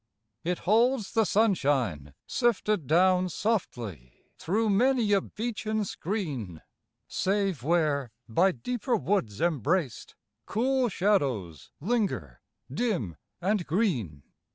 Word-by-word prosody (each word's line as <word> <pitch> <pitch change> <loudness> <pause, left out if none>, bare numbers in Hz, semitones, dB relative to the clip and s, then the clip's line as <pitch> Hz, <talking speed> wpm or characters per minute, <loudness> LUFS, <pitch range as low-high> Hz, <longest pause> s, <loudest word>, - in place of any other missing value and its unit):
It 180 +1 -1
holds 225 +2 +2
the 225 -1 +3
sunshine 135 - +1
sifted 215 - 0
down 185 +3 +4
Softly 115 - -3 0.2
through 215 +5 +1
many 240 +1 +3
a 195 - +4
beechen 215 -1 -3
screen. 145 - -4 0.4
Save 195 - 0
where, 145 -4 +1 0.2
by 175 +12 +3
deeper 240 - -2
woods 190 - -1
embraced. 165 - 0 0.3
Cool 255 +3 +1
shadows 135 - 0
linger, 185 - -1 0.3
dim 150 - -1 0.3
and 195 0 0
green. 130 - -1
185 Hz, 100 wpm, -28 LUFS, 130-215 Hz, 0.4 s, down